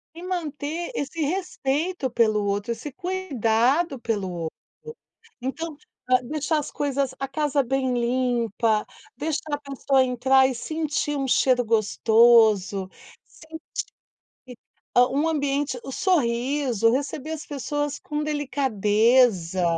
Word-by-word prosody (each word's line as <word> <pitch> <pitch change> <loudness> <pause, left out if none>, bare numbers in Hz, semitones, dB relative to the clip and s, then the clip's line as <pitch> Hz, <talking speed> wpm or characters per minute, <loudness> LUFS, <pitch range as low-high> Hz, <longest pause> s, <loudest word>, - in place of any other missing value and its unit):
E 345 - -9
manter 335 - -4
esse 310 +3 -3
respeito 310 -2 -1
pelo 215 -3 +2
outro, 200 +3 -1
esse 245 +6 -5
cuidado 280 - 0
pelo 205 -5 -2
outro, 165 -2 -5 0.8
então, 310 +4 -4 0.3
hã, 255 0 +4
deixar 305 +2 -1
as 290 - -5
coisas, 275 -2 -1
a 270 - -2
casa 285 0 0
bem 260 +1 0
limpa, 235 -3 0 0.3
deixar 310 -1 -3
a - - -9
pessoa 275 -1 +1
entrar 260 +1 +3
e 260 - -2
sentir 300 +1 -2
um 270 -1 -2
cheiro 250 0 +3
gostoso, 220 -3 +4 0.4
sentir 320 0 -12 0.9
que 250 -1 -11 0.4
um 275 +6 +4
ambiente 285 -3 -1
o 270 - -7
sorriso, 250 - +1
receber 285 +3 -3
as 310 - -7
pessoas 290 0 -3
com 300 0 -4
delicadeza, 230 - +2
270 Hz, 120 wpm, -24 LUFS, 235-295 Hz, 0.9 s, hã